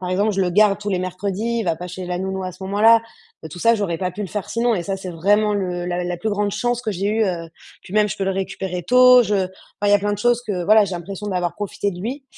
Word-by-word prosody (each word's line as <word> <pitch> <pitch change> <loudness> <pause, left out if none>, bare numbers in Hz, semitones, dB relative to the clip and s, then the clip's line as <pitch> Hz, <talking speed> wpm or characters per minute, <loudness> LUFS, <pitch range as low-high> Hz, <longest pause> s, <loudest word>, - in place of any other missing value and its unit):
par 180 - -4
exemple, 200 +4 +1
je 195 - -1
le 185 - +2
garde 200 +1 +4
tous 205 0 -5
les 190 -2 0
mercredis, 200 +5 -2
il 225 - -2
va 165 -3 0
pas 180 +2 -7
chez 180 0 -7
la 180 0 -3
nounou 190 0 -3
à 185 - -5
ce 185 +2 -13
moment-là. 220 +4 +5 0.4
Heu, - - -6
tout 175 - -9
ça, 230 +6 +4
j'aurais 195 -6 -2
pas 185 -1 -2
pu 205 +4 -6
le - - -3
faire 205 -1 -5
sinon 235 0 +1
et 180 - -2
ça, 195 +2 -3
c'est 190 -1 -7
vraiment 205 +5 +2
le 180 -3 -2
la 175 0 -2
la 175 0 -3
plus 215 +6 -2
grande 205 0 0
chance 240 +3 -1
que 230 -3 -3
j'ai 195 0 -2
eue 220 +1 +2
heu. 170 -4 -3 0.3
Puis - - -13
même 210 0 +3
je - - -4
peux 195 - -2
le 190 - 0
récupérer 190 -1 -4
tôt, 250 +3 +7
je 210 -2 -1
voilà, 190 -2 0 0.4
il 205 - +3
y - - +5
a 205 - +6
plein 205 +1 -1
de - - -9
choses 240 +2 +2
que 185 -4 -2
voilà, 215 +2 +6
j'ai 190 - -6
l'impression 190 +4 -6
d'avoir 180 -3 -1
profité 205 0 -3
de 175 -2 -8
lui, 260 +7 -5
195 Hz, 305 wpm, -21 LUFS, 180-210 Hz, 0.4 s, tôt